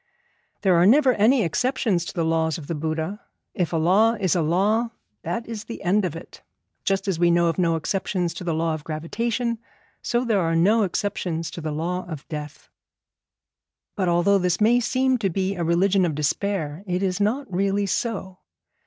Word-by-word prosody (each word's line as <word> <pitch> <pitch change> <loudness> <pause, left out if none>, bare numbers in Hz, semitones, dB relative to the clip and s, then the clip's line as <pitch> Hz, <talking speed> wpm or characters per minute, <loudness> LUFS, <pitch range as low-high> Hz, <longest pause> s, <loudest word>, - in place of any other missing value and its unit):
There 190 -2 +4
are 175 +2 +5
never 265 +2 +5
any 230 +3 +3
exceptions 205 - 0
to - - -7
the 165 - 0
laws 160 0 +1
of 155 - -9
the 165 - -3
Buddha. 160 +6 -3 0.3
If 180 -5 -1
a 165 - 0
law 195 +8 +4
is 185 -4 +1
a 175 - +2
law, 200 +9 +1 0.3
that 180 +8 -3
is 220 -2 -6
the 230 -1 -8
end 195 +2 +2
of 170 - -3
it. 165 - -11 0.4
Just 195 +1 0
as 185 -4 -1
we 175 0 +4
know 170 0 +3
of 165 - -2
no 170 -2 +2
exceptions 180 +1 -2
to - - -7
the 170 -3 -1
law 165 0 0
of 155 -1 -5
gravitation, 230 +10 -2 0.4
so 240 +1 0
there 215 -5 +2
are 165 -1 0
no 205 +7 +4
exceptions 170 -3 -3
to 170 - -7
the 155 -1 -3
law 175 +4 -3
of 155 -4 -8
death. 150 -2 -7 1.3
But 185 -4 0
although 175 +4 +3
this 180 -1 0
may 230 +3 +4
seem 255 +1 +1
to 200 -3 0
be 190 +2 -1
a 175 -3 -3
religion 185 +3 +2
of 165 -4 0
despair, 155 +2 -2
it 180 +1 -1
is 185 0 -1
not 240 +8 +1
really 200 +2 +1
so. 195 -2 -3
185 Hz, 195 wpm, -24 LUFS, 165-210 Hz, 1.3 s, are